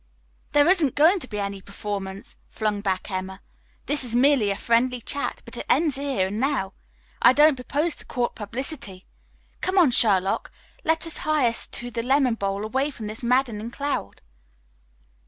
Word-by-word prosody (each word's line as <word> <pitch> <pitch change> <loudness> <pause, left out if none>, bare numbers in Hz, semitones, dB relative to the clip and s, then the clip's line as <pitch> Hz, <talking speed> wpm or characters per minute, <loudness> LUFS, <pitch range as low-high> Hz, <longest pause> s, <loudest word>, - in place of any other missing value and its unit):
"There 290 +1 +5
isn't 345 -8 +3
going 330 +7 +5
to 255 - -9
be 210 - -6
any 200 -1 -4
performance," 200 0 -6
flung 210 -2 -2
back 190 0 -2
Emma. 190 0 -4 0.5
"This 290 -2 +1
is 240 -2 -4
merely 255 -4 +4
a 200 - -1
friendly 245 +2 +1
chat, 280 +5 -4
but - - -11
it - - -5
ends 310 -4 +3
here 275 -8 0
and 205 +3 -3
now. 260 -8 0 0.5
I 245 - +7
don't 295 +1 +5
propose 290 +6 -1
to - - -9
court 245 -2 -1
publicity. 215 -3 -5 0.6
Come 375 +1 -1
on, 335 -8 +6
Sherlock, 195 -5 +3 0.3
let 320 +1 +1
us 330 - -5
hie 305 -5 +2
us 230 - -3
to 245 0 -6
the 230 - -2
lemonade 255 -1 +2
bowl 195 +1 -2
away 265 +6 0
from 235 -6 -8
this 215 +3 -6
madding 235 -3 +1
crowd." 280 - -4
240 Hz, 175 wpm, -24 LUFS, 205-285 Hz, 0.6 s, I